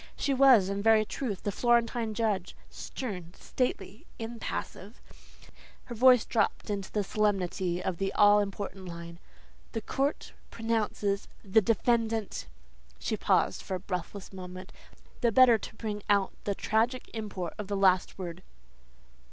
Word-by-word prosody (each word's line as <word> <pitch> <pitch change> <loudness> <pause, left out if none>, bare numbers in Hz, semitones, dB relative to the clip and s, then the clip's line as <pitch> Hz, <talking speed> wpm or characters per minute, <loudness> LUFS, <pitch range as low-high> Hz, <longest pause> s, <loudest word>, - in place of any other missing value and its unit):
She 280 - 0
was, 260 -7 +6
in 200 +1 -2
very 220 0 +5
truth, 215 -4 -4
the 205 - -1
Florentine 235 0 +1
judge, 205 -5 -1 0.2
stern, 185 -9 -6
stately, 215 -5 -3
impassive. 225 -2 -6 0.9
Her 240 - -7
voice 250 0 +6
dropped 225 -2 0
into 200 -2 -4
the 210 - 0
solemnity 190 -3 0
of 185 -2 -2
the 195 0 0
all 205 0 +6
important 200 -1 -4
line, 170 0 -9 0.5
"'The 225 - -2
court 275 +6 -2 0.2
pronounces 215 -3 -1 0.2
the 205 +2 +4
defendant 225 0 0 0.3
'" 60 0 -30
She - - -2
paused - - +1
for 190 - -4
a - - -3
breathless 190 +1 -6
moment, 185 0 -8 0.5
the 235 - +3
better 240 -1 +6
to 215 - -9
bring 210 -2 -4
out 200 -2 +3
the 200 - -1
tragic 230 +6 0
import 200 -6 -4
of 210 - -4
the 200 0 -2
last 185 -2 +3
word. 175 -1 -6
205 Hz, 145 wpm, -29 LUFS, 190-225 Hz, 0.9 s, was